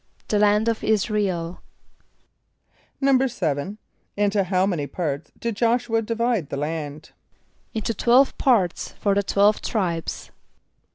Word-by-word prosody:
=The 210 Hz, -, +2 dB
land 210 Hz, +1 st, +3 dB
of 230 Hz, -1 st, +2 dB
[)I][s+]´ra 210 Hz, -1 st, +1 dB
el.= 170 Hz, 0 st, -5 dB, 1.4 s
=7.= 210 Hz, -, +1 dB, 0.4 s
Into 205 Hz, -1 st, +2 dB
how 185 Hz, 0 st, +2 dB
many 170 Hz, -7 st, -1 dB
parts 150 Hz, 0 st, -4 dB
did 230 Hz, -2 st, -3 dB
J[)o]sh´u 235 Hz, +1 st, +1 dB
[.a] 225 Hz, -, +3 dB
divide 230 Hz, -, -1 dB
the -, -, -4 dB
land? 150 Hz, 0 st, -4 dB, 0.6 s
=Into 225 Hz, +1 st, -1 dB
twelve 245 Hz, +6 st, +4 dB
parts 215 Hz, -, +1 dB
for 200 Hz, -, 0 dB
the 200 Hz, -, +2 dB
twelve 200 Hz, +1 st, +3 dB
tribes. 175 Hz, -7 st, -3 dB
205 Hz, 125 wpm, -23 LUFS, 170-230 Hz, 1.4 s, twelve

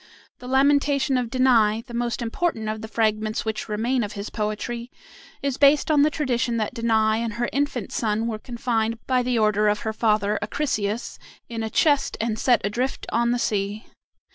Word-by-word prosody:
The 250 Hz, -, -10 dB
"Lamentation 280 Hz, +1 st, +3 dB
of 250 Hz, -2 st, 0 dB
Danae," 230 Hz, -4 st, +3 dB
the 240 Hz, -, -11 dB
most 240 Hz, 0 st, -2 dB
important 230 Hz, -1 st, -2 dB
of 215 Hz, 0 st, -3 dB
the 220 Hz, -, -6 dB
fragments 215 Hz, 0 st, 0 dB
which 220 Hz, 0 st, -3 dB
remain 235 Hz, +4 st, 0 dB
of 205 Hz, -, -5 dB
his 200 Hz, +1 st, -6 dB
poetry, 230 Hz, +3 st, -3 dB, 0.5 s
is 275 Hz, -2 st, -1 dB
based 285 Hz, +2 st, +4 dB
upon 295 Hz, -2 st, +5 dB
the 300 Hz, -, +5 dB
tradition 250 Hz, -6 st, -1 dB
that 215 Hz, +1 st, -2 dB
Danae 220 Hz, -2 st, +2 dB
and 230 Hz, -2 st, -3 dB
her 240 Hz, +1 st, -1 dB
infant 275 Hz, -6 st, -1 dB
son 220 Hz, 0 st, -1 dB
were 220 Hz, -2 st, -3 dB
confined 230 Hz, -1 st, -2 dB
by 255 Hz, -1 st, +2 dB, 0.2 s
order 215 Hz, -1 st, +3 dB
of 210 Hz, 0 st, +1 dB
her 220 Hz, -1 st, -3 dB
father, 210 Hz, -2 st, +1 dB
Acrisius, 215 Hz, -2 st, -2 dB, 0.3 s
in 230 Hz, -1 st, -4 dB
a 220 Hz, -, -2 dB
chest 285 Hz, +4 st, +2 dB
and 220 Hz, -1 st, -1 dB
set 245 Hz, -1 st, +3 dB
adrift 240 Hz, +7 st, -2 dB
on 235 Hz, +1 st, +2 dB
the 245 Hz, -, +1 dB
sea. 205 Hz, -1 st, -2 dB
230 Hz, 180 wpm, -24 LUFS, 215-255 Hz, 0.5 s, upon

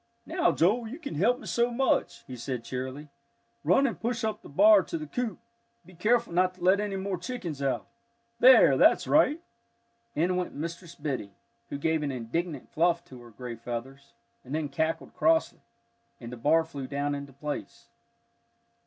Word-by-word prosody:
"Now, 345 Hz, +2 st, +2 dB
Joel, 220 Hz, +8 st, +2 dB
you 250 Hz, +6 st, -7 dB
can 320 Hz, -4 st, -7 dB
help 220 Hz, +11 st, +2 dB
me -, -, -12 dB
so 235 Hz, +1 st, +1 dB
much," 260 Hz, +3 st, 0 dB
he 130 Hz, -, -8 dB
said 125 Hz, 0 st, -4 dB
cheerily. 130 Hz, +4 st, -6 dB, 0.5 s
"Run 180 Hz, -, +4 dB
and 245 Hz, -, -2 dB
push 235 Hz, +1 st, -2 dB
up 220 Hz, -1 st, -2 dB
the -, -, -13 dB
bar 205 Hz, +6 st, +6 dB
to 165 Hz, -, -5 dB
the 155 Hz, -, -6 dB
coop. 235 Hz, +8 st, -3 dB, 0.5 s
Be 185 Hz, -, -16 dB
careful 225 Hz, +4 st, +1 dB
not 185 Hz, +1 st, +2 dB
to 180 Hz, -, -12 dB
let 190 Hz, +2 st, +5 dB
any 205 Hz, -1 st, -2 dB
more 190 Hz, -2 st, -3 dB
chickens 175 Hz, -, -5 dB
out. 130 Hz, -5 st, -1 dB, 0.5 s
There, 255 Hz, +2 st, +7 dB
that's -, -, +5 dB
right!" 315 Hz, +4 st, +3 dB, 0.7 s
In 175 Hz, +4 st, +1 dB
went 180 Hz, -, -3 dB
Mistress 170 Hz, +2 st, -6 dB
Biddy, 130 Hz, -, -4 dB, 0.3 s
who -, -, -4 dB
gave 160 Hz, +2 st, 0 dB
an 145 Hz, -2 st, -2 dB
indignant 135 Hz, +5 st, -4 dB
fluff 170 Hz, +1 st, +1 dB
to 130 Hz, -6 st, -12 dB
her 120 Hz, -, -13 dB
gray 120 Hz, +2 st, -7 dB
feathers, 120 Hz, +4 st, -7 dB, 0.3 s
and 130 Hz, +4 st, -5 dB
then 155 Hz, -2 st, -2 dB
cackled 160 Hz, +4 st, -2 dB
crossly, 325 Hz, 0 st, +2 dB, 0.6 s
and 120 Hz, -1 st, -8 dB
the -, -, -6 dB
bar 155 Hz, +7 st, +3 dB
flew 145 Hz, -5 st, -7 dB
down 145 Hz, +1 st, -2 dB
into 140 Hz, -1 st, -6 dB
place. 145 Hz, +2 st, -6 dB
165 Hz, 180 wpm, -28 LUFS, 140-210 Hz, 0.7 s, There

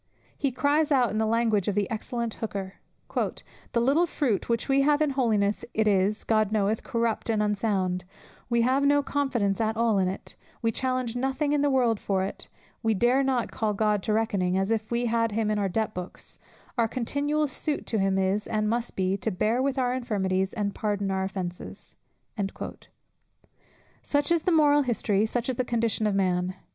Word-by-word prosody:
He 275 Hz, -, 0 dB
cries 295 Hz, +4 st, +1 dB
out 255 Hz, -4 st, +3 dB
in 215 Hz, -, -1 dB
the 220 Hz, -, +1 dB
language 225 Hz, -3 st, +1 dB
of 205 Hz, -, 0 dB
the 205 Hz, -2 st, +1 dB
excellent 235 Hz, +1 st, -3 dB
Hooker, 195 Hz, -3 st, -5 dB, 0.3 s
"The 235 Hz, -, -3 dB
little 285 Hz, +9 st, +3 dB
fruit 250 Hz, -, -1 dB
which 230 Hz, -1 st, 0 dB
we 275 Hz, 0 st, +3 dB
have 295 Hz, +1 st, +3 dB
in 305 Hz, -2 st, +2 dB
holiness, 215 Hz, -6 st, +1 dB
it 220 Hz, 0 st, +2 dB
is, 200 Hz, +1 st, +2 dB
God 215 Hz, -2 st, +2 dB
knoweth, 215 Hz, 0 st, +1 dB
corrupt 230 Hz, -1 st, -1 dB
and 215 Hz, -2 st, +2 dB
unsound: 195 Hz, -3 st, 0 dB, 0.5 s
we 235 Hz, -1 st, +3 dB
put 260 Hz, +3 st, +2 dB
no 285 Hz, 0 st, +4 dB
confidence 240 Hz, -9 st, 0 dB
at 220 Hz, 0 st, 0 dB
all 225 Hz, -3 st, +3 dB
in 185 Hz, -, +2 dB
it, 185 Hz, -, -6 dB, 0.2 s
we 230 Hz, -, +1 dB
challenge 255 Hz, -1 st, -1 dB
nothing 270 Hz, +3 st, 0 dB
in 295 Hz, -, +2 dB
the 290 Hz, -, +3 dB
world 245 Hz, -5 st, +2 dB
for 190 Hz, -2 st, 0 dB
it, 195 Hz, -, -6 dB, 0.3 s
we 225 Hz, -2 st, +1 dB
dare 245 Hz, +6 st, +3 dB
not 260 Hz, -3 st, 0 dB
call 215 Hz, -2 st, -1 dB
God 210 Hz, -1 st, +1 dB
to 215 Hz, -, -2 dB
reckoning, 200 Hz, -4 st, +1 dB
as 195 Hz, +3 st, 0 dB
if 220 Hz, -1 st, -1 dB
we 240 Hz, +1 st, 0 dB
had 230 Hz, -1 st, +1 dB
him 215 Hz, 0 st, 0 dB
in 210 Hz, -, 0 dB
our 200 Hz, -1 st, 0 dB
debt 220 Hz, +3 st, -1 dB
books; 180 Hz, 0 st, -4 dB, 0.4 s
our 230 Hz, -, +4 dB
continual 285 Hz, +6 st, 0 dB
suit 290 Hz, +2 st, -3 dB
to 220 Hz, -, -1 dB
him 195 Hz, 0 st, +2 dB
is, 195 Hz, +2 st, 0 dB
and 215 Hz, -1 st, 0 dB
must 235 Hz, +2 st, -1 dB
be, 190 Hz, 0 st, +1 dB
to 220 Hz, -, -2 dB
bear 220 Hz, +5 st, +1 dB
with 270 Hz, 0 st, 0 dB
our 250 Hz, -1 st, +1 dB
infirmities, 190 Hz, -6 st, -1 dB
and 205 Hz, -3 st, -2 dB
pardon 205 Hz, -2 st, -1 dB
our 190 Hz, 0 st, 0 dB
offences." 185 Hz, -2 st, -6 dB, 2.1 s
Such 290 Hz, +3 st, 0 dB
is 340 Hz, -1 st, +3 dB
the 365 Hz, -, +1 dB
moral 295 Hz, -3 st, +5 dB
history, 220 Hz, -5 st, +1 dB
such 240 Hz, +1 st, -2 dB
the 255 Hz, 0 st, -1 dB
condition 230 Hz, -2 st, 0 dB
of 205 Hz, -, 0 dB
man. 185 Hz, -1 st, 0 dB
225 Hz, 190 wpm, -27 LUFS, 200-255 Hz, 2.1 s, moral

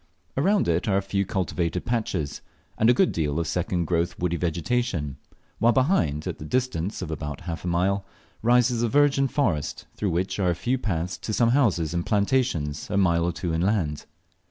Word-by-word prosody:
Around 195 Hz, +9 st, +2 dB
it 85 Hz, +4 st, +1 dB
are 100 Hz, -2 st, +3 dB
a -, -, +2 dB
few 100 Hz, 0 st, -1 dB
cultivated 90 Hz, -4 st, -1 dB
patches, 110 Hz, -, -2 dB, 0.3 s
and 110 Hz, -, +3 dB
a -, -, +7 dB
good 185 Hz, +6 st, +3 dB
deal 75 Hz, -1 st, -1 dB
of 85 Hz, -, -1 dB
second 85 Hz, +1 st, -1 dB
growth 85 Hz, +1 st, 0 dB
woody 85 Hz, -1 st, 0 dB
vegetation; 85 Hz, -, -1 dB, 0.4 s
while 120 Hz, +2 st, +4 dB
behind, 120 Hz, -, +1 dB
at -, -, -4 dB
the -, -, -7 dB
distance 105 Hz, -2 st, -1 dB
of 80 Hz, -, -5 dB
about 75 Hz, -2 st, -5 dB
half 85 Hz, -1 st, -5 dB
a -, -, -4 dB
mile, 95 Hz, +3 st, +1 dB, 0.4 s
rises 120 Hz, 0 st, +3 dB
the 120 Hz, -, +1 dB
virgin 140 Hz, 0 st, +3 dB
forest, 100 Hz, -, -1 dB
through 105 Hz, -, -2 dB
which 90 Hz, +4 st, -1 dB
are 90 Hz, -2 st, +2 dB
a 85 Hz, -, +1 dB
few 125 Hz, +9 st, -1 dB
paths 90 Hz, -5 st, -2 dB
to 110 Hz, -, -4 dB
some 115 Hz, +1 st, +3 dB
houses 100 Hz, -, +2 dB
and 85 Hz, 0 st, -2 dB
plantations 100 Hz, -, 0 dB
a 100 Hz, -, 0 dB
mile 85 Hz, -3 st, +3 dB
or 85 Hz, -, +1 dB
two 85 Hz, 0 st, -3 dB
inland. 85 Hz, -3 st, 0 dB
90 Hz, 190 wpm, -25 LUFS, 85-120 Hz, 0.4 s, a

